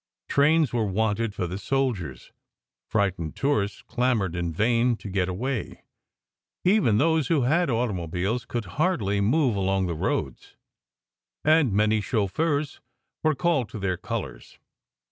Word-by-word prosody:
Trains 150 -2 +3
were 115 -3 +1
wanted 105 +2 0
for 90 - -2
the 90 +3 -5
soldiers. 100 - -2 0.6
Frightened 95 -7 -1
tourists 105 -8 -1
clamoured 120 -8 0
in 85 -1 -2
vain 115 +7 +2
to 110 - -10
get 95 -1 0
away. 120 +7 -4 0.8
Even 180 - +4
those 160 +1 +2
who 155 -6 +2
had 165 +7 +2
automobiles 105 -1 -1
could 120 -2 -3 0.2
hardly 105 - +1
move 125 +2 +2
along 95 -1 +1
the 85 - -2
roads, 80 - -3 0.9
and 155 -5 +4
many 105 +2 +2
chauffeurs 145 - -1 0.4
were 155 -1 +2
called 140 -8 +1
to - - -7
their 95 -2 -1
colours. - - -6
110 Hz, 130 wpm, -25 LUFS, 95-140 Hz, 0.9 s, Even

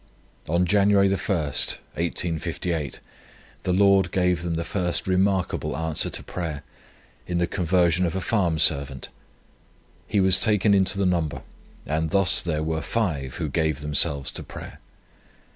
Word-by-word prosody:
On 85 +3 +1
January 100 +1 +3
1, 95 - +1
1858, 85 -1 -1 0.6
the 90 - -2
Lord 100 0 +3
gave 90 -2 0
them 85 -1 -3
the 85 - -2
first 90 +1 -2
remarkable 95 -6 -1
answer 80 -1 -1
to - - -5
prayer 80 -5 -6 0.6
in 90 - -2
the 85 - +1
conversion 90 0 +1
of 85 - -4
a - - -1
farm 90 -5 0
servant. 70 -4 +1 1.0
He 105 - 0
was 95 0 +5
taken 105 -2 +3
into 95 0 +3
the 100 - 0
number, 85 -4 -1 0.4
and 80 +2 -2
thus 95 +1 +4
there 80 -3 -2
were 80 0 -2
five 75 - -3
who 80 - -3
gave 80 0 -1
themselves 75 -1 +3
to - - -8
prayer. - - -11
85 Hz, 145 wpm, -24 LUFS, 80-95 Hz, 1.0 s, was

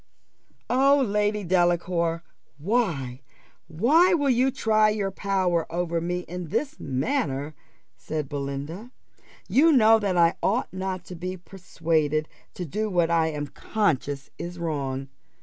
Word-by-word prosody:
"O 275 +3 +4
Lady 210 -3 0
Delacour, 175 -1 +1 0.3
why, 150 - -1 0.5
why 295 - +4
will 285 -4 +2
you 255 +2 +3
try 215 -4 +2
your 205 -2 -1
power 185 -5 0
over 170 -1 -1
me 175 +1 -2
in 180 0 -7
this 290 - -2
manner?" 145 - -2 0.4
said 155 -2 -4
Belinda. 145 - -5 0.6
"You 320 +5 +5
know 225 -5 +6
that 195 -4 -1
I 170 0 +4
ought 225 +2 0
not 185 -1 -4
to 180 - -8
be 185 +2 -5
persuaded 160 -4 -1 0.3
to 180 - -4
do 215 +7 -2
what 175 -3 +1
I 165 -1 +3
am 150 -2 -3
conscious 145 - -1
is 175 +1 -6
wrong. 140 -5 -3
180 Hz, 130 wpm, -25 LUFS, 160-215 Hz, 0.6 s, know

